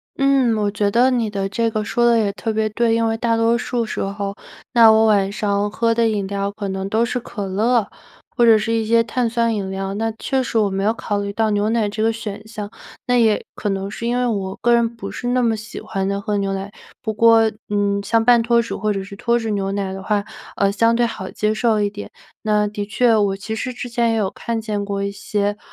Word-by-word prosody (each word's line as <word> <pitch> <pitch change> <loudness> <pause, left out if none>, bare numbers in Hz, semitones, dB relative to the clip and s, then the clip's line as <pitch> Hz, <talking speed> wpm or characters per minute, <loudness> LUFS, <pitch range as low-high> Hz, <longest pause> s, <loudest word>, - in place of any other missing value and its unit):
嗯， 275 -4 +3
我 205 -1 0
觉 205 0 0
得 245 +5 +3
你 235 -3 0
的 195 -1 -2
这 230 +4 0
个 215 -1 -2
说 240 +3 0
得 235 -1 +5
也 210 -3 +1
特 225 - -3
别 220 0 0
对。 230 +1 +1
因 230 0 +1
为 225 0 0
大 230 0 +1
多 230 +1 +3
数 240 -1 -2
时 - - -5
候， 200 0 -3 0.4
那 230 -2 +8
我 220 0 +4
晚 200 -2 +3
上 205 0 0
喝 230 +2 +1
的 230 0 +2
饮 205 -2 -1
料 200 0 -2
可 205 0 -5
能 190 0 -3
都 220 +3 +2
是 250 +1 -2
可 210 -3 -6
乐， 215 +3 +1 0.5
或 240 - +3
者 225 -1 +7
是 220 +2 -1
一 225 -1 +1
些 230 +1 +4
碳 240 0 -1
酸 230 0 +1
饮 200 -3 -3
料， 195 0 -3
那 225 +2 -1
确 265 +2 -1
实 240 -2 -2
我 210 -2 +3
没 195 0 -2
有 210 - +3
考 205 -2 -3
虑 200 0 -3
到 220 +1 +1
牛 205 +1 +1
奶 225 -2 +1
这 210 +1 -4
个 225 +1 +3
选 215 -1 -7
项。 215 -2 -7 0.3
那 245 - +1
也 220 -3 +2
可 210 - -3
能 195 0 -2
是 230 - -4
因 240 +1 0
为 250 - +1
我 195 -5 -2
个 240 0 +3
人 235 -1 +3
不 200 -3 -7
是 245 - -5
那 250 0 +2
么 225 -1 +2
喜 220 +1 -8
欢 195 -2 -3
地 200 0 -1
喝 205 +1 -2
牛 195 -1 -1
奶。 195 +1 -6 0.3
不 220 - -2
过， 225 0 +5 0.2
嗯， 200 -1 0
像 225 +2 +2
半 240 -1 +6
脱 235 +1 +3
脂 230 - -5
或 215 +2 -1
者 195 -1 -2
是 200 +1 -10
脱 235 +3 +1
脂 225 -2 -3
牛 195 -1 -1
奶 195 -1 -2
的 195 - -6
话， 205 +1 -1 0.3
呃， 200 0 +2
相 230 +3 +2
对 240 0 +2
好 220 -5 -5
接 215 0 -1
受 220 -1 +1
一 205 -1 +1
点。 205 0 -8 0.3
那 210 -1 +2
的 205 0 -4
确 230 +2 +2
我 200 -2 +2
其 200 +3 -5
实 250 +4 -4
之 245 0 -6
前 235 -1 +1
也 - - 0
有 200 -3 0
看 230 +2 -3
见 210 -2 -3
过 200 -1 -2
一 200 - -2
些， 205 +1 -2
215 Hz, 275 characters per minute, -20 LUFS, 200-230 Hz, 0.5 s, 那